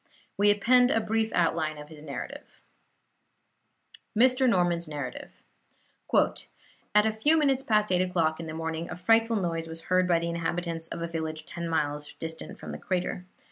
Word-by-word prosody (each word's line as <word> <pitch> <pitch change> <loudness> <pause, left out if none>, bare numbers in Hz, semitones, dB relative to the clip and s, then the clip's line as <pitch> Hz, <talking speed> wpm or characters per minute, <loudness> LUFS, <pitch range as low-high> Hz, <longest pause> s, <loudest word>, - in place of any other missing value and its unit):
We 205 +1 +4
append 245 +5 +5
a 225 - +3
brief 220 0 0
outline 160 -2 +1
of 150 0 -10
his 155 -2 -12
narrative: 145 -3 -8 1.5
MR. 255 +2 +5
NORMAN'S 175 -4 +2
NARRATIVE 145 -4 -6 1.6
"At 210 0 +6
a 220 - +1
few 295 +9 +3
minutes 275 -4 +3
past 215 -6 +1
8 180 0 +3
o'clock 165 -4 +1
in 165 - -6
the 155 - -6
morning 160 +1 -3
a - - -5
frightful 225 +4 +3
noise 165 -4 -2
was 165 0 -6
heard 185 0 +4
by 175 -2 +4
the 170 0 -2
inhabitants 170 0 -3
of 170 - -5
a - - -2
village 160 -1 -4
ten 170 -1 -5
miles 150 -2 -1
distant 160 0 -6
from - - -8
the - - -6
crater. 180 -1 -2
170 Hz, 170 wpm, -28 LUFS, 160-215 Hz, 1.6 s, At